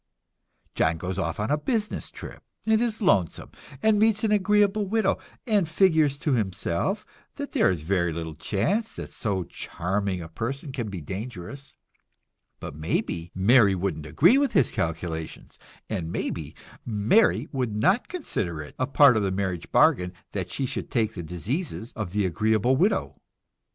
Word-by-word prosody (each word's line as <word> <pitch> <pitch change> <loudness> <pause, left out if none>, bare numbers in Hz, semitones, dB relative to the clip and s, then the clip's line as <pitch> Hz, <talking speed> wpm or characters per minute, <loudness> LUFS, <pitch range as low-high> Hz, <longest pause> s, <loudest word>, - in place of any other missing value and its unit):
John 80 0 +1
goes 90 +3 -4
off 85 -1 -2
on 105 +6 -1
a 150 - +2
business 215 - -2
trip, - - -10 0.2
and 220 0 +3
is 225 -2 -1
lonesome, 95 - +1 0.3
and 220 -1 +4
meets 220 0 +3
an 220 - +2
agreeable 210 0 +3
widow, 210 -1 +1 0.3
and 205 -8 +2
figures 160 -5 +3
to 150 -1 0
himself 95 -6 -1 0.3
that - - -5
there - - +3
is 85 -5 -2
very 85 0 +1
little 80 -1 -5
chance 155 - -1
that - - -7
so 100 -5 -2
charming 95 +3 -3
a 85 - -7
person 130 - -4
can 120 -5 -4
be 95 -4 -6
dangerous. 105 - -7 0.8
But - - -7
maybe 80 +2 -2
Mary 100 +1 +5
wouldn't 85 -5 -3
agree 170 - +5
with 285 -1 +1
his 130 - +3
calculations; 80 -1 -4 0.3
maybe 85 -6 -3 0.3
Mary 115 - +3
would 125 -6 -2
not 185 - +2
consider 90 - -3
it 75 - -12
a 130 - +1
part 140 -2 +6
of 110 - +2
the 100 - +1
marriage 95 -3 -3
bargain 90 0 +4 0.2
that 95 -3 -3
she 130 +10 -2
should - - -4
take 115 -3 0
the 90 - -5
diseases 110 - -4
of 110 -6 -5
the 105 0 +1
agreeable 110 +7 +2
widow. 185 +10 0
110 Hz, 160 wpm, -26 LUFS, -, 0.8 s, part